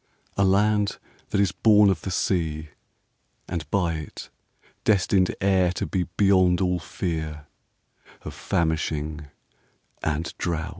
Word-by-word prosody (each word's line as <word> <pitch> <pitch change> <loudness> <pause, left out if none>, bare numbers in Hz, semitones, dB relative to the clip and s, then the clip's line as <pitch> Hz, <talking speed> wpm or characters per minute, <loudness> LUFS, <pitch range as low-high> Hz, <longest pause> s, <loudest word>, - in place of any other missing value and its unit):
A 100 - +2
land 105 +2 +2 0.3
that - - 0
is 100 -3 +3
born 105 0 +5
of 85 -5 -3
the - - -4
sea 80 -4 -1 0.8
and 85 -4 -5
by 90 -3 +1
it 80 -2 -8 0.5
destined 95 -2 +3
e'er 95 -2 +3
to - - -3
be 90 -3 -2
Beyond 95 -3 +4
all 90 -1 +1
fear 80 -3 -4 0.8
of - - -7
famishing 80 -2 -2 0.7
and 80 +2 -2
drouth. 80 -2 -2
90 Hz, 120 wpm, -25 LUFS, 80-95 Hz, 0.8 s, born